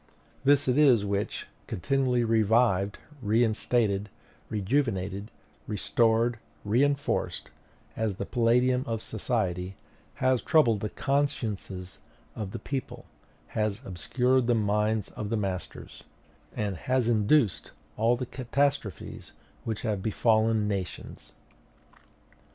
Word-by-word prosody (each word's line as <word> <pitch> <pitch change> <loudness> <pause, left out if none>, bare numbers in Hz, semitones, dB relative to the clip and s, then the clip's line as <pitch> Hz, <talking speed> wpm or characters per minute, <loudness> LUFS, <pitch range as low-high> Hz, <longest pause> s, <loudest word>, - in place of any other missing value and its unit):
This 140 0 +4
it 130 +3 +3
is 125 -8 +5
which, 100 0 -2 0.2
continually 125 +3 +1
revived, 110 -3 +2 0.2
reinstated, 110 -2 +1 0.4
rejuvenated, 105 -3 -1 0.4
restored, 115 +2 +2 0.3
re 115 +6 +3
enforced 140 0 -1 0.4
as 110 -3 -1
the - - -4
palladium 125 +1 +2
of 115 -1 -2
society 95 -5 -2 0.4
has 130 -1 +2
troubled 130 -9 +4
the 105 - -3
consciences 110 -10 -2 0.4
of 105 -3 -4
the - - -5
people, 135 -1 -5 0.4
has 105 -1 -1
obscured 125 - +1
the 120 - +3
minds 105 0 0
of 105 - -5
the 115 - 0
masters, 95 -3 -5 0.5
and 100 -4 -2
has 130 +4 0
induced 115 0 +2 0.3
all 115 +3 +2
the 125 - -3
catastrophes 140 +3 -2 0.3
which 110 -2 -3
have 105 -5 -1
befallen 110 0 +2
nations. 95 -3 -5
110 Hz, 105 wpm, -28 LUFS, 100-125 Hz, 0.5 s, is